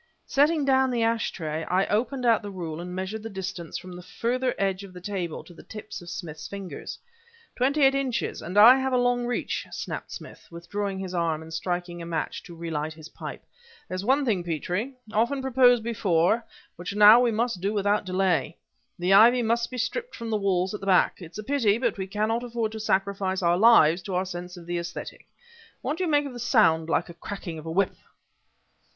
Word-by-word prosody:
Setting 295 Hz, +1 st, +2 dB
down 265 Hz, -1 st, +3 dB
the 240 Hz, -2 st, 0 dB
ash 230 Hz, 0 st, +1 dB
tray, 160 Hz, -2 st, -4 dB
I 185 Hz, +2 st, +1 dB
opened 250 Hz, +4 st, -1 dB
out 230 Hz, -2 st, +4 dB
the 205 Hz, -, -7 dB
rule 170 Hz, -4 st, -5 dB
and 180 Hz, +1 st, -7 dB
measured 190 Hz, +4 st, -4 dB
the 225 Hz, -, -6 dB
distance 190 Hz, -4 st, -5 dB
from 185 Hz, +1 st, -10 dB
the 180 Hz, -, -8 dB
further 250 Hz, +7 st, -2 dB
edge 195 Hz, 0 st, -1 dB
of 195 Hz, -2 st, -11 dB
the 180 Hz, -, -9 dB
table 180 Hz, -3 st, -4 dB
to 175 Hz, -, -15 dB
the -, -, -13 dB
tips 215 Hz, -2 st, -9 dB
of 175 Hz, -, -10 dB
Smith's 160 Hz, -5 st, -7 dB
fingers. 195 Hz, -2 st, -7 dB, 0.6 s
"Twenty 275 Hz, +4 st, +2 dB
eight 270 Hz, 0 st, +6 dB
inches 270 Hz, -3 st, -2 dB
and 180 Hz, +4 st, -5 dB
I 235 Hz, +5 st, +9 dB
have 265 Hz, 0 st, -1 dB
a -, -, +4 dB
long 245 Hz, 0 st, +1 dB
reach!" 245 Hz, -, -2 dB
snapped -, -, -6 dB
Smith, -, -, -10 dB
withdrawing 195 Hz, +4 st, -4 dB
his 190 Hz, -1 st, -5 dB
arm 165 Hz, -3 st, -1 dB
and 160 Hz, 0 st, -11 dB
striking 175 Hz, +1 st, -3 dB
a 170 Hz, -, -7 dB
match 165 Hz, -2 st, -3 dB
to 175 Hz, -, -11 dB
relight 160 Hz, -2 st, -4 dB
his 160 Hz, -1 st, -11 dB
pipe. -, -, -8 dB, 0.4 s
"There's 185 Hz, +1 st, -4 dB
one 270 Hz, +5 st, +2 dB
thing, 200 Hz, -8 st, 0 dB
Petrie, 180 Hz, -, -3 dB, 0.2 s
often 235 Hz, +6 st, +1 dB
proposed 250 Hz, -3 st, +4 dB
before, 220 Hz, -1 st, +1 dB, 0.3 s
which 180 Hz, +3 st, -6 dB
now 210 Hz, +3 st, +9 dB
we 245 Hz, -1 st, +3 dB
must 230 Hz, -3 st, -1 dB
do 200 Hz, +2 st, 0 dB
without 205 Hz, 0 st, +1 dB
delay. 185 Hz, -4 st, 0 dB, 0.4 s
The 180 Hz, +2 st, +2 dB
ivy 235 Hz, +5 st, +7 dB
must 235 Hz, +1 st, 0 dB
be 255 Hz, -, -7 dB
stripped 475 Hz, -, -3 dB
from 230 Hz, -1 st, -6 dB
the -, -, +1 dB
walls 190 Hz, -2 st, 0 dB
at 210 Hz, -, -4 dB
the 195 Hz, -, -8 dB
back. 190 Hz, 0 st, +3 dB
It's 170 Hz, +2 st, -10 dB
a 215 Hz, -, -5 dB
pity, 230 Hz, -5 st, +2 dB
but 235 Hz, -5 st, -1 dB
we 190 Hz, -, -3 dB
can 210 Hz, +2 st, -1 dB
not 230 Hz, +2 st, 0 dB
afford 230 Hz, -2 st, -2 dB
to 220 Hz, -, -6 dB
sacrifice 195 Hz, -2 st, 0 dB
our 170 Hz, 0 st, +4 dB
lives 180 Hz, -5 st, +6 dB
to 190 Hz, -3 st, -4 dB
our 185 Hz, +1 st, 0 dB
sense 180 Hz, 0 st, -7 dB
of 170 Hz, -, -11 dB
the 175 Hz, 0 st, -2 dB
aesthetic. 170 Hz, 0 st, -7 dB, 0.6 s
What 305 Hz, -, -2 dB
do -, -, 0 dB
you -, -, -1 dB
make 290 Hz, -1 st, +3 dB
of 275 Hz, -, -6 dB
the 240 Hz, -, -8 dB
sound 200 Hz, -, +3 dB
like 165 Hz, -, +1 dB
the 170 Hz, -, -11 dB
cracking 170 Hz, -1 st, -7 dB
of 155 Hz, -, -10 dB
a -, -, -3 dB
whip?" 190 Hz, +3 st, +1 dB
200 Hz, 220 wpm, -26 LUFS, 175-235 Hz, 0.6 s, I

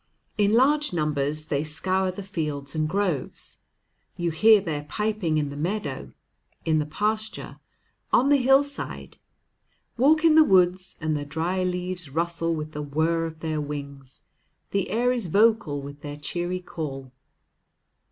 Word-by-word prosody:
In 205 Hz, +1 st, +3 dB
large 290 Hz, +3 st, +4 dB
numbers 150 Hz, -1 st, -1 dB
they 145 Hz, -1 st, -1 dB
scour 185 Hz, +5 st, -1 dB
the 185 Hz, +2 st, -6 dB
fields 150 Hz, -7 st, -4 dB
and 155 Hz, -1 st, 0 dB
groves. 185 Hz, -7 st, -2 dB, 0.6 s
You 175 Hz, -1 st, -1 dB
hear 215 Hz, +6 st, +6 dB
their 160 Hz, -6 st, -3 dB
piping 205 Hz, -2 st, -1 dB
in 150 Hz, -2 st, 0 dB
the 140 Hz, -, -7 dB
meadow, 155 Hz, -3 st, -3 dB, 0.5 s
in 160 Hz, -1 st, +2 dB
the 150 Hz, -, -2 dB
pasture, 215 Hz, +6 st, -2 dB, 0.5 s
on 265 Hz, +3 st, +4 dB
the 290 Hz, -, +6 dB
hillside. 275 Hz, +2 st, 0 dB, 0.8 s
Walk 310 Hz, +5 st, +4 dB
in 320 Hz, -, +7 dB
the 315 Hz, 0 st, +8 dB
woods, 185 Hz, -4 st, +2 dB
and 155 Hz, -1 st, -1 dB
the 145 Hz, -, -2 dB
dry 165 Hz, +6 st, -2 dB
leaves 180 Hz, -2 st, -3 dB
rustle 165 Hz, +2 st, -1 dB
with 155 Hz, 0 st, -5 dB
the 150 Hz, -, -5 dB
whir 160 Hz, +3 st, 0 dB
of 160 Hz, -1 st, -11 dB
their 155 Hz, -2 st, -2 dB
wings, 140 Hz, -2 st, -8 dB, 0.5 s
the 195 Hz, -2 st, 0 dB
air 240 Hz, +4 st, +2 dB
is 240 Hz, -7 st, -2 dB
vocal 200 Hz, -7 st, +2 dB
with 145 Hz, +1 st, -9 dB
their 145 Hz, 0 st, -6 dB
cheery 175 Hz, +5 st, -3 dB
call. 135 Hz, -7 st, -6 dB
170 Hz, 150 wpm, -25 LUFS, 150-205 Hz, 0.8 s, the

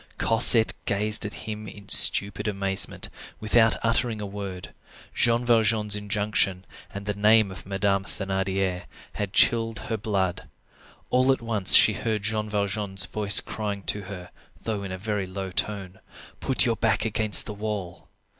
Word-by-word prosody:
Cosette 115 Hz, 0 st, +5 dB
gazed 105 Hz, +2 st, +2 dB
at 105 Hz, -, -9 dB
him 110 Hz, -1 st, -7 dB
in 100 Hz, 0 st, -12 dB
stupid 100 Hz, +2 st, +4 dB
amazement, 100 Hz, -1 st, -1 dB, 0.3 s
without 110 Hz, +1 st, +3 dB
uttering 115 Hz, -1 st, 0 dB
a 105 Hz, -, -5 dB
word. 100 Hz, -2 st, -8 dB, 0.4 s
Jean 120 Hz, 0 st, +1 dB
Valjean's 110 Hz, -3 st, +2 dB
injunction, 105 Hz, -2 st, -1 dB, 0.3 s
and 100 Hz, 0 st, -8 dB
the 105 Hz, -, -2 dB
name 105 Hz, 0 st, +3 dB
of 95 Hz, -, -11 dB
Madame 100 Hz, 0 st, -1 dB
Thénardier, 95 Hz, -2 st, -3 dB, 0.3 s
had 100 Hz, -2 st, -4 dB
chilled 115 Hz, 0 st, +2 dB
her 110 Hz, +3 st, -4 dB
blood. 95 Hz, -4 st, -3 dB, 0.6 s
All 130 Hz, +1 st, +3 dB
at 130 Hz, -, 0 dB
once 110 Hz, -5 st, +4 dB
she -, -, +6 dB
heard 110 Hz, -3 st, -3 dB
Jean 110 Hz, 0 st, -3 dB
Valjean's 100 Hz, -2 st, -1 dB
voice 105 Hz, +2 st, +3 dB
crying 100 Hz, -2 st, -5 dB
to 105 Hz, -, -2 dB
her, 90 Hz, -3 st, -10 dB, 0.3 s
though 110 Hz, -3 st, -3 dB
in 95 Hz, -1 st, -7 dB
a 95 Hz, -, -5 dB
very 100 Hz, -1 st, -4 dB
low 95 Hz, 0 st, -6 dB
tone:— 95 Hz, -1 st, -4 dB, 0.4 s
"Put 130 Hz, 0 st, +3 dB
your 115 Hz, -2 st, 0 dB
back 110 Hz, -1 st, 0 dB
against 110 Hz, -1 st, +3 dB
the 105 Hz, -, -6 dB
wall." 105 Hz, -4 st, -6 dB
105 Hz, 155 wpm, -24 LUFS, 95-110 Hz, 0.6 s, she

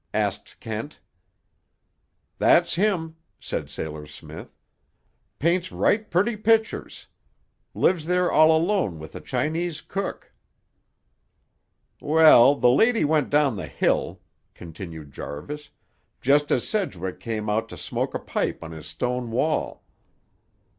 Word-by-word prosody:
asked -, -, -2 dB
Kent. -, -, -6 dB, 1.4 s
"That's 170 Hz, 0 st, +4 dB
him," 170 Hz, -4 st, 0 dB, 0.2 s
said -, -, -4 dB
Sailor 75 Hz, -1 st, -6 dB
Smith. 75 Hz, -, -11 dB, 0.8 s
"Paints 175 Hz, +3 st, +1 dB
right 215 Hz, 0 st, +1 dB
purty 205 Hz, +7 st, +1 dB
pictures. 220 Hz, +1 st, 0 dB, 0.7 s
Lives 165 Hz, -4 st, +1 dB
there 180 Hz, 0 st, +2 dB
all 155 Hz, +1 st, +6 dB
alone 160 Hz, -, +1 dB
with 80 Hz, 0 st, -11 dB
a -, -, -7 dB
Chinese 160 Hz, +1 st, -2 dB
cook." 195 Hz, +4 st, -5 dB, 1.7 s
"Well, 150 Hz, -4 st, +7 dB
the 125 Hz, -, +4 dB
lady 225 Hz, -, +3 dB
went 150 Hz, -2 st, +1 dB
down 145 Hz, -6 st, +2 dB
the 90 Hz, -4 st, -5 dB
hill," -, -, -1 dB, 0.3 s
continued 80 Hz, -3 st, -9 dB
Jarvis, 145 Hz, -, -7 dB, 0.5 s
"just 145 Hz, +3 st, +3 dB
as 120 Hz, -, +1 dB
Sedgwick 95 Hz, -, -3 dB
come 110 Hz, -2 st, -4 dB
out 110 Hz, +2 st, -1 dB
to -, -, -9 dB
smoke -, -, -3 dB
a -, -, -1 dB
pipe -, -, -3 dB
on 80 Hz, -, -8 dB
his 80 Hz, -1 st, -9 dB
stone 125 Hz, +10 st, -3 dB
wall. 150 Hz, +7 st, -1 dB
150 Hz, 120 wpm, -24 LUFS, -, 1.7 s, Well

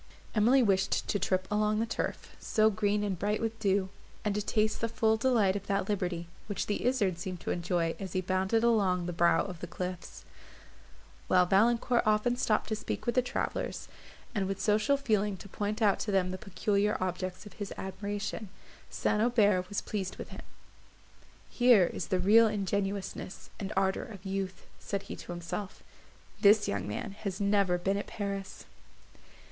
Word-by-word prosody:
Emily 240 Hz, +5 st, +5 dB
wished 195 Hz, -3 st, +1 dB
to 205 Hz, -, +1 dB
trip 185 Hz, -1 st, 0 dB
along 210 Hz, 0 st, +2 dB
the 225 Hz, -, +1 dB
turf, -, -, -4 dB
so 220 Hz, 0 st, +3 dB
green 205 Hz, 0 st, +1 dB
and 195 Hz, -4 st, -2 dB
bright 210 Hz, +2 st, 0 dB
with 225 Hz, 0 st, -3 dB
dew, 195 Hz, -2 st, +1 dB, 0.4 s
and 210 Hz, -, +1 dB
to 210 Hz, -, -1 dB
taste 215 Hz, +1 st, 0 dB
the 230 Hz, -, 0 dB
full 220 Hz, 0 st, +2 dB
delight 220 Hz, -5 st, +2 dB
of 200 Hz, 0 st, -5 dB
that 195 Hz, -1 st, 0 dB
liberty, 180 Hz, -4 st, -2 dB, 0.2 s
which 205 Hz, -, -2 dB
the 205 Hz, -, -2 dB
izard 200 Hz, -9 st, +1 dB
seemed 180 Hz, 0 st, -5 dB
to -, -, -3 dB
enjoy 170 Hz, -1 st, 0 dB
as 190 Hz, -3 st, -6 dB
he 185 Hz, -, +1 dB
bounded 190 Hz, +5 st, +1 dB
along 195 Hz, -7 st, +3 dB
the 175 Hz, -, -3 dB
brow 170 Hz, -1 st, +3 dB
of 180 Hz, -4 st, -7 dB
the 175 Hz, -, -6 dB
cliffs; 180 Hz, +1 st, -6 dB, 1.0 s
while 180 Hz, -1 st, +5 dB
Valancourt 230 Hz, +6 st, +3 dB
often 215 Hz, +3 st, +2 dB
stopped 215 Hz, -3 st, +1 dB
to 215 Hz, -, 0 dB
speak 215 Hz, -, -4 dB
with 240 Hz, -, +1 dB
the 255 Hz, -, +4 dB
travellers, 245 Hz, -, -3 dB, 0.5 s
and 200 Hz, -4 st, 0 dB
with 195 Hz, 0 st, -3 dB
social 215 Hz, +6 st, +2 dB
feeling 210 Hz, -7 st, 0 dB
to 200 Hz, -, -11 dB
point 210 Hz, +3 st, -2 dB
out 200 Hz, -2 st, +4 dB
to 215 Hz, -, -3 dB
them 185 Hz, -2 st, +2 dB
the 185 Hz, -, -4 dB
peculiar 205 Hz, +2 st, 0 dB
objects 185 Hz, +1 st, -3 dB
of 210 Hz, -, -11 dB
his 200 Hz, -, -4 dB
admiration. 200 Hz, +2 st, -4 dB, 0.4 s
St. 210 Hz, -, 0 dB
Aubert 205 Hz, -6 st, +3 dB
was 205 Hz, -, -2 dB
pleased 195 Hz, -2 st, -4 dB
with -, -, -7 dB
him: -, -, -9 dB, 1.1 s
"Here 245 Hz, -6 st, +5 dB
is 160 Hz, -, -4 dB
the 185 Hz, -, +1 dB
real 215 Hz, +5 st, +6 dB
ingenuousness 200 Hz, -2 st, -3 dB
and 200 Hz, -1 st, -4 dB
ardour 190 Hz, 0 st, +1 dB
of 205 Hz, -5 st, -11 dB
youth," 190 Hz, -1 st, -4 dB
said 200 Hz, -1 st, -3 dB
he -, -, -7 dB
to -, -, -8 dB
himself; 175 Hz, +3 st, -5 dB, 0.6 s
"this 210 Hz, 0 st, +5 dB
young 100 Hz, 0 st, -2 dB
man 105 Hz, -, -4 dB
has 195 Hz, -2 st, -4 dB
never 200 Hz, -3 st, +2 dB
been 195 Hz, +3 st, 0 dB
at 200 Hz, -, -4 dB
Paris." 200 Hz, -2 st, -5 dB
200 Hz, 180 wpm, -30 LUFS, 185-215 Hz, 1.1 s, real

